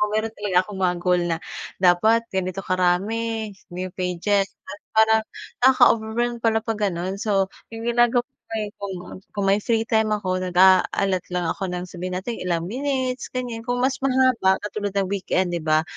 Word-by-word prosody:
meron 220 +1 0
talaga 205 -3 0
akong 195 0 -8
mga 180 -1 +2
goal 180 0 +3
na 165 -1 0 0.4
dapat 190 +6 +4
ganito 190 0 -2
karami 210 +5 0 0.2
new 185 +1 -4
pages. 185 +2 +1 0.2
Tapos 200 +2 -10
parang 220 0 +5 0.4
nakaka-overwhelm 240 -2 +3
pala 225 -1 +2
'pag 225 -1 -2
gano'n. 185 +1 -3
So, 195 -3 +1 0.2
yung 225 0 -6
ginagawa 240 +1 +3 0.6
ko 200 - -4
nun, 180 +1 -9 0.2
kung 195 -1 +2
may 200 - +3
free 225 +1 +1
time 220 -1 +2
ako, 185 -3 -2
nag-a-alot 185 +1 +3
lang 180 -1 0
ako 195 - -4
ng 180 0 -4
sabihin 180 +1 -5
natin 215 +6 -4
ilang 170 -2 -1
minutes, 260 +4 -2
ganiyan. 240 -3 -4
Kung 245 0 0
mas 265 0 +1
mahaba, 255 -7 +3
katulad 205 -1 -4
ng 195 -2 0
weekend 185 -2 0
di 175 - -1
ba, 155 0 +2
200 Hz, 165 wpm, -23 LUFS, 185-225 Hz, 0.6 s, parang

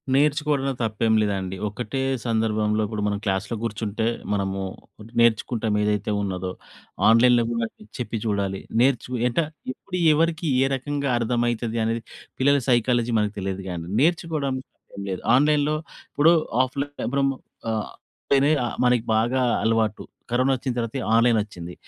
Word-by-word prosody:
నేర్చుకోవడంలో 145 -1 +2
తప్పేంలేదండి. 105 -4 +1
ఒకటే 110 +6 -4 0.2
సందర్భంలో 110 -2 +1
ఇప్పుడు 105 -1 -3
మనం 100 0 0
క్లాస్‌లో 100 +3 -1
కూర్చుంటే 110 -1 -2 0.3
మనము 95 -1 -1 0.6
నేర్చుకుంటాం 115 -1 +2
ఏదైతే 105 0 0
ఉన్నదో. 95 -2 -3 0.6
ఆన్‍లైన్‍లో 120 +1 +5
కూడా 115 -1 0 0.3
చెప్పి 120 -2 -3
చూడాలి. 100 -2 -1 0.2
నేర్చు 125 -1 +2 0.2
అంట 120 - -1 0.3
ఎప్పుడు 180 +7 -6 0.2
ఎవరికి, 165 +1 +1
ఏ - - +4
రకంగా 140 +1 -2
అర్థమైతదనేది 115 -1 -1 0.4
పిల్లల 140 +2 +4
సైకాలజీ 120 -1 +2
మనకు 105 0 -1
తెలియదు. 95 0 -3
కానీ, 85 -2 -5 0.2
నేర్చుకోవడానికి 155 -5 0
తప్పేం 100 - -10
లేదు. 90 - -4
ఆన్‍లైన్‍లో 150 +2 +3 0.4
ఇప్పుడు 160 +4 +5 0.3
ఆఫ్‍లైన్ 140 +2 -4
ఇప్పుడు 140 +2 0
మ్ - - -3 0.4
అ - - +1 0.6
పెనే 140 +2 +5
ఆహ్, 120 - -4
మనకి 125 -2 +3
బాగా 120 +4 +2 0.2
అలవాటు. 110 -2 +1 0.3
కరోనా 130 +2 +3
వచ్చిన 125 0 -3
తర్వాత 115 +1 -3 0.2
ఆన్‍లైన్ 115 -1 +4
వచ్చింది. 90 -4 -9
115 Hz, 130 wpm, -24 LUFS, 105-135 Hz, 0.6 s, ఆన్‍లైన్‍లో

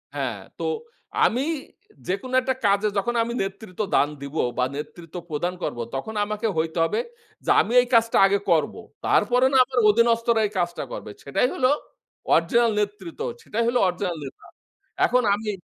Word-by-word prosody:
হ্যাঁ। - - -3 0.2
তো - - -4 0.6
আমি 250 +4 +1 0.6
যেকোনো 200 +8 -3
একটা 260 +1 0
কাজে 200 +1 +3
যখন 240 +5 0
আমি 235 +1 -4
নেতৃত্ব 195 0 -6
দান 145 - +4
দিব 140 +2 -8 0.2
বা, 125 - +2
নেতৃত্ব 165 +3 -8
প্রদান 170 +4 -2
করবো, 120 - -3
তখন 175 +12 -4
আমাকে 210 +1 -2
হইতে 160 +1 -1
হবে 165 - 0 0.5
যে - - -3
আমি 225 - -3
এই 245 - -4
কাজটা 230 0 +4
আগে 200 +1 +2
করবো। 160 -3 +1 0.3
তারপরে 245 +4 +3
না - - +5
আমার 255 -1 -1
অধীনস্থরা 230 +1 +3
এই - - -13
কাজটা 175 0 -1
করবে। 105 - -7
সেটাই 140 - +1
হলো 255 -1 +2 0.7
অরিজিনাল 230 +8 +3
নেতৃত্ব। 210 - -4 0.2
সেটাই 230 +2 -1
হল 240 - 0
অরিজিনাল 180 0 -2
নেতা। 135 - -10 0.6
এখন 250 0 +3
আমি 210 +1 -5
205 Hz, 160 wpm, -24 LUFS, 175-235 Hz, 0.7 s, না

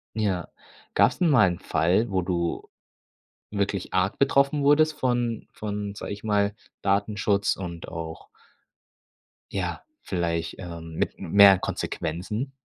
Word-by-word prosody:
Ja. 100 -5 -1 0.4
Gab's - - +3
denn 175 - +3
mal 130 -10 +6
einen 85 -1 -2
Fall, 90 +9 +1
wo 95 -1 +1
du 85 -2 -2 0.8
wirklich 100 -2 -2
arg 95 +2 +1
betroffen 140 +1 +3
wurdest 155 +2 +5
von 120 -4 -1
von, 105 -1 -5
sage 100 - -6
ich 100 - -10
mal, 105 -1 +1 0.3
Datenschutz 100 0 +1
und 85 -3 -7
auch 80 -1 -7 1.2
ja, 90 -3 -3 0.2
vielleicht, 85 -2 -2
ähm, 85 -3 -8
mit - - -1
m - - -7
mehr 100 -2 +8
Konsequenzen? 105 - -3
100 Hz, 130 wpm, -26 LUFS, 85-110 Hz, 1.2 s, mehr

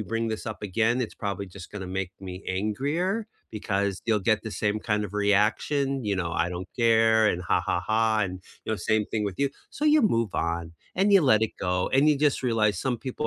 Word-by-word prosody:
bring 115 +3 -2
this 110 0 -4
up 110 -1 -6
again, 115 +5 +1
it's 115 - -5
probably 100 -1 -3
just 95 -1 -11
gonna 95 -3 -6
make 95 0 -3
me 95 0 -7
angrier, 145 - -1 0.2
because 100 -2 -2
you'll 110 -2 +2
get 110 +2 +1
the 110 - -5
same 105 0 -1
kind 105 -1 -1
of 100 +1 -8
reaction, 110 +7 +1
you 105 - 0
know, 85 -2 -2
"I 80 +3 0
don't 90 +1 -6
care," 110 -2 +4
and, 90 - -1
"Ha, - - +1
ha, 90 - 0
ha," 110 +3 +1
and, 95 -2 -3 0.2
you - - -1
know, 110 - -1
same 110 0 0
thing 105 -2 -2
with 100 -3 -4
you, 140 - +2 0.2
so 295 - -4
you 300 -2 +5
move 115 - +1
on, 85 0 -2 0.2
and 195 +2 +2
you 195 - +8
let 110 -7 +4
it 110 - 0
go, 90 -1 0
and 140 +3 +4
you 145 - +1
just 145 -2 +2
realize 110 -6 +1
some 125 +2 -1
people 130 -2 -4
110 Hz, 225 wpm, -26 LUFS, 95-120 Hz, 0.2 s, you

